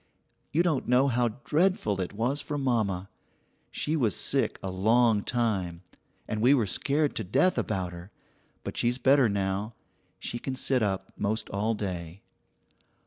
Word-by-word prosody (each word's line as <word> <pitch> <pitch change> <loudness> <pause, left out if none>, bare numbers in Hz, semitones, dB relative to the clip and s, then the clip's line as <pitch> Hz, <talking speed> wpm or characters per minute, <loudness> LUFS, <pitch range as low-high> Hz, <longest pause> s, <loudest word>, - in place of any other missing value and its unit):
You 165 +3 +3
don't 160 -7 0
know 125 +3 +4
how 120 -1 +2 0.2
dreadful 150 - +1
it 90 - -3
was 120 +7 -1
for 145 - -4
mamma; 110 -9 0 0.6
she 155 - -2
was 115 - +1
sick - - 0
a 95 - -3
long 110 +3 +3
time, 95 -8 -1 0.4
and 110 - -2
we 130 +5 +6
were 120 -5 +2
scared 145 +8 0
to 110 - -1
death 135 - +2
about 95 -4 -2
her, 85 +2 -10 0.5
but - - -5
she's 120 +1 +1
better 130 -1 +4
now; 100 +2 -2 0.4
she 120 - -4
can 130 +1 -4
sit 130 -1 +1
up 95 -2 -2
most 110 +2 -2
all 105 +3 0
day. 90 -3 -5
110 Hz, 155 wpm, -28 LUFS, 95-130 Hz, 0.6 s, we